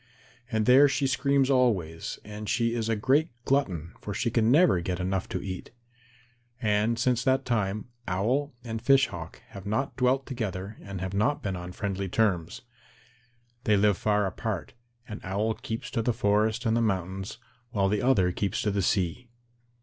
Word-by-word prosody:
And 110 -2 +1
there 135 +4 +7
she 135 +1 0
screams 135 +1 +2
always, 95 -11 +1
and 105 0 -7
she 115 0 +1
is 115 -1 -1
a 115 - +2
great 135 +9 +2 0.2
glutton, 90 - 0
for 100 - -5
she 115 +2 0
can 115 -1 +3
never 145 - +5
get 90 +1 -3
enough 95 +1 -1
to - - -3
eat. 95 -2 -6 0.9
And 110 0 +1
since 125 0 +1
that 130 0 +2
time, 105 -4 -1 0.2
Owl 120 +11 0
and 115 -2 -4
Fish 135 +2 +4
Hawk 85 -3 -8
have 100 0 -9
not 120 +7 -1
dwelt 130 +2 +2
together 105 -5 -4
and 100 -2 -7
have 95 +1 -3
not 110 +9 +1
been 95 -2 -2
on 90 0 -6
friendly 100 0 -3
terms. 90 -5 0 1.0
They 105 -1 +4
live 105 0 +4
far 105 +1 +1
apart, 95 0 -4 0.3
and 105 - -7
Owl 100 +4 0
keeps 115 +4 -6
to 115 - 0
the 120 +2 +1
forest 110 +3 +1
and 110 0 +2
the 120 - +2
mountains, 95 -1 -2 0.3
while 100 -5 +1
the 105 +1 +1
other 100 -9 +3
keeps 100 +1 -2
to 105 - +1
the 100 0 0
sea. 95 +6 0
110 Hz, 175 wpm, -28 LUFS, 95-125 Hz, 1.0 s, there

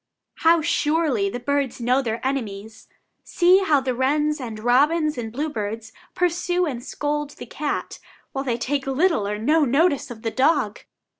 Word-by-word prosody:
How 330 0 +4
surely 295 -10 +1
the 245 - -5
birds 280 0 -1
know 250 +3 +2
their 230 -1 -4
enemies! 220 -4 -4 0.4
See 360 +2 +4
how 315 -7 +3
the 260 -1 -1
wrens 295 +4 0
and 225 -4 -6
robins 295 +7 +2
and 230 -3 -5
bluebirds 225 -5 -4 0.2
pursue 360 0 +1
and 250 -6 -4
scold 295 +1 -3
the - - -8
cat, 295 -1 -4 0.3
while 270 - -3
they 245 -4 -1
take 270 +3 -2
little 270 - +1
or 210 +1 -2
no 300 +9 +2
notice 280 +1 +2
of 230 -2 -10
the 225 - -1
dog! 260 -6 +1
270 Hz, 160 wpm, -23 LUFS, 235-305 Hz, 0.4 s, How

